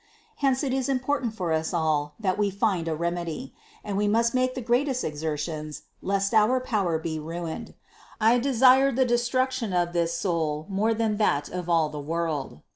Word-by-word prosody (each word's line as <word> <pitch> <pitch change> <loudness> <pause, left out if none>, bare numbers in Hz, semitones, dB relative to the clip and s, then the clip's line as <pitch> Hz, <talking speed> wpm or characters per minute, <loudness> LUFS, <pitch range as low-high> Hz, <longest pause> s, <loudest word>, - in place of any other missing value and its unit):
Hence 270 0 +1
it 265 -2 -1
is 265 0 -1
important 255 -3 -1
for 175 -5 -1
us 160 +2 -1
all 150 -3 0
that 190 -4 0
we 205 -1 +2
find 195 -4 0
a 160 - 0
remedy; 170 +7 -3 0.3
and 205 - -4
we 205 +1 +1
must 230 +2 +2
make 255 0 +1
the - - -3
greatest 250 +2 +1
exertions, 150 0 -4 0.2
lest 195 +2 0
our 220 +4 +4
power 200 -10 0
be 160 0 -4
ruined. 165 +1 -6 0.4
I 230 +3 +4
desire 265 +1 +5
the 260 +1 +2
destruction 240 -2 0
of 175 -1 +1
this 170 -1 0
soul 160 -4 -1
more 215 +4 +1
than 220 -2 0
that 145 -9 +1
of 180 -1 -5
all 165 -2 +3
the 150 - -6
world. 155 - -3
195 Hz, 180 wpm, -26 LUFS, 165-245 Hz, 0.4 s, desire